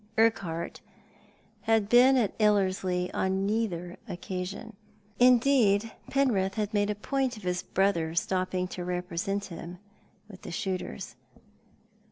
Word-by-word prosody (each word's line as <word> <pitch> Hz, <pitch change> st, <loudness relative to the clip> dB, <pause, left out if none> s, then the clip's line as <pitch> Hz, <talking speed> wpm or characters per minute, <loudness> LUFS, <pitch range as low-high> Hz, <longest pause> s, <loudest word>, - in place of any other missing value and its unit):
Urquhart 195 Hz, -7 st, 0 dB, 0.9 s
had 220 Hz, -2 st, +3 dB
been 250 Hz, +4 st, +6 dB
at 225 Hz, -6 st, +1 dB
Ellerslie 185 Hz, -3 st, +1 dB
on 190 Hz, +1 st, 0 dB
neither 195 Hz, -5 st, -2 dB
occasion. 185 Hz, +4 st, -5 dB, 0.4 s
Indeed, 245 Hz, -4 st, +4 dB, 0.2 s
Penrith 215 Hz, -9 st, +1 dB
had 215 Hz, 0 st, -2 dB
made 205 Hz, 0 st, +2 dB
a 210 Hz, -, -1 dB
point 260 Hz, +3 st, -1 dB
of 210 Hz, -, -12 dB
his 180 Hz, 0 st, -1 dB
brother 170 Hz, -4 st, 0 dB
stopping 185 Hz, +1 st, 0 dB
to 180 Hz, -, -5 dB
represent 180 Hz, +2 st, -2 dB
him 170 Hz, 0 st, -8 dB, 0.5 s
with 195 Hz, -3 st, -13 dB
the -, -, -8 dB
shooters. 180 Hz, -, -4 dB
195 Hz, 120 wpm, -28 LUFS, 180-225 Hz, 0.9 s, been